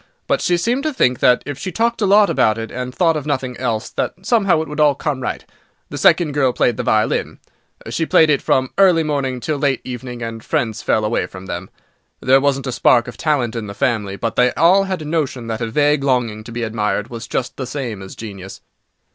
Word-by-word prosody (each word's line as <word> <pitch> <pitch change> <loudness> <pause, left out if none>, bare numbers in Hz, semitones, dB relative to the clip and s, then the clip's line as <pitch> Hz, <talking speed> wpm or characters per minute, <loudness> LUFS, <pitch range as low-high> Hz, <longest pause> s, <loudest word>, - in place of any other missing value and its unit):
But - - 0
she 175 - +2
seemed 235 +9 0
to 310 0 -2
think 125 - +2
that, 125 - +4
if 145 -1 -6
she 185 - -4
talked 230 +5 0
a 205 - +2
lot 205 +1 +6
about 110 - +2
it, 115 0 -5
and 125 0 -4
thought 165 +3 +2
of 150 -1 -4
nothing 130 -3 -2
else, 115 -4 -2
that - - -2
somehow 195 -9 +2
it - - -10
would 150 +1 -6
all 150 -2 +4
come 140 -2 -3
right. 125 - -4 0.5
The - - -5
second 170 -4 +4
girl 135 -3 +1
played 120 -2 +1
the - - -1
violin. 110 0 0 0.5
She 165 - -2
played 160 -1 +5
it 140 - +2
from 130 -1 +1
early 180 -4 +5
morning 140 -4 -2
till 150 +3 -2
late 135 -2 +1
evening, 125 -1 -6
and 115 -1 -6
friends 110 -2 -1
fell 110 - +1
away 110 - 0
from 95 0 -11
them. 90 0 -6 0.5
There 135 +1 +4
wasn't 140 -1 0
a 130 - -2
spark 120 0 +3
of 125 - -8
talent 130 -5 0
in 115 -2 -4
the 100 - -8
family, 105 -5 -1
but 115 +2 -3
they 125 0 +4
all 185 +4 +4
had 185 -4 -3
a - - -8
notion 150 -6 -2
that 115 0 -4
a 115 - -1
vague 145 +4 +2
longing 120 -5 0
to 115 - -9
be 120 0 -4
admired 110 0 -2
was 115 -1 -7
just 125 - -3
the 130 - -4
same 125 -7 -5
as 95 - -9
genius. 95 -4 -9
130 Hz, 230 wpm, -19 LUFS, 115-150 Hz, 0.5 s, lot